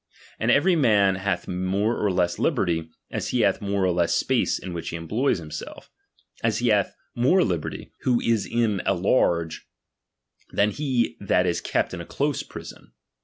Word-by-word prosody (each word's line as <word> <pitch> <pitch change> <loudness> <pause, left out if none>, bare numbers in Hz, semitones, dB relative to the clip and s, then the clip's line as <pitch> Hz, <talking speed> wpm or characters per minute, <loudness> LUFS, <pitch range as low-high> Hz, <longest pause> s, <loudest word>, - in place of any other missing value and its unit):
And 110 - 0
every 170 +9 +4
man 105 - +4
hath 95 -2 -2
more 95 +5 0
or 105 - 0
less 90 -1 0
liberty, 80 -2 0 0.2
as - - -3
he 125 - +1
hath 100 -3 +2
more 100 -1 -1
or 90 - +2
less 85 -1 +1
space - - +1
in 90 - -7
which 85 -1 -4
he - - -5
employs 105 +12 0
himself: 80 -2 -8 0.5
as 115 -2 +1
he 120 +1 +1
hath 105 -2 +2 0.2
more 140 +11 +3
liberty, 85 -5 -3
who 125 -2 +2
is 115 -3 +1
in 115 -5 +1
a 100 - +3
large, 85 -4 +1 0.8
than 105 +1 +2
he 130 -4 -1
that 90 -2 +2
is 85 -1 0
kept - - -1
in - - -5
a - - -8
close - - -1
prison. - - -11
100 Hz, 175 wpm, -25 LUFS, 90-115 Hz, 0.8 s, every